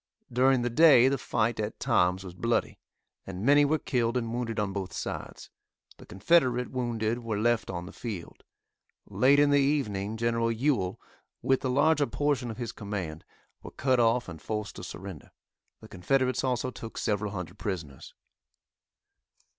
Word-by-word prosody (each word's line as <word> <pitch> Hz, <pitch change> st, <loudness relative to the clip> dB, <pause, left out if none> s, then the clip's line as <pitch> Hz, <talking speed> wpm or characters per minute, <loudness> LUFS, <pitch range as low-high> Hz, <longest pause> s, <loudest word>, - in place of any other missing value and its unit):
During 130 Hz, 0 st, +3 dB
the 120 Hz, -, -1 dB
day 135 Hz, -3 st, +7 dB
the 135 Hz, -1 st, -1 dB
fight 115 Hz, +1 st, -1 dB
at 105 Hz, 0 st, -4 dB
times 90 Hz, +2 st, +2 dB
was 90 Hz, -2 st, -8 dB
bloody, 115 Hz, +6 st, -1 dB, 0.5 s
and 95 Hz, +2 st, -5 dB
many 145 Hz, +2 st, +6 dB
were 155 Hz, +2 st, +2 dB
killed 120 Hz, -4 st, 0 dB
and 115 Hz, -2 st, -3 dB
wounded 115 Hz, -2 st, -2 dB
on 100 Hz, -2 st, -1 dB
both 95 Hz, -3 st, -4 dB
sides. -, -, -6 dB, 0.5 s
The -, -, -15 dB
Confederate 125 Hz, -, +2 dB
wounded 120 Hz, -2 st, -1 dB
were 115 Hz, -3 st, -3 dB
left 120 Hz, +2 st, +1 dB
on 90 Hz, -2 st, -4 dB
the 95 Hz, -, -10 dB
field. 105 Hz, -8 st, -7 dB, 0.6 s
Late 135 Hz, +3 st, +3 dB
in 145 Hz, 0 st, +4 dB
the 145 Hz, -, +5 dB
evening 110 Hz, -8 st, 0 dB
Gen. 115 Hz, +1 st, 0 dB, 0.2 s
Ewell, 115 Hz, -6 st, 0 dB, 0.4 s
with 135 Hz, 0 st, +2 dB
the 130 Hz, -, -1 dB
larger 145 Hz, +2 st, +3 dB
portion 140 Hz, -2 st, -1 dB
of 110 Hz, -, -6 dB
his 120 Hz, -2 st, -4 dB
command, 100 Hz, -8 st, -5 dB, 0.4 s
were -, -, -9 dB
cut 130 Hz, -1 st, +1 dB
off 115 Hz, +1 st, +2 dB
and 80 Hz, -3 st, -9 dB
forced 105 Hz, -1 st, -4 dB
to 95 Hz, -, -8 dB
surrender. 95 Hz, -3 st, -9 dB, 0.5 s
The -, -, -12 dB
Confederates 130 Hz, +9 st, 0 dB
also 130 Hz, -1 st, -1 dB
took 115 Hz, -2 st, -9 dB
several 105 Hz, -2 st, -1 dB
hundred 90 Hz, +1 st, -7 dB
prisoners. 80 Hz, -11 st, -6 dB
115 Hz, 160 wpm, -28 LUFS, 100-130 Hz, 0.6 s, day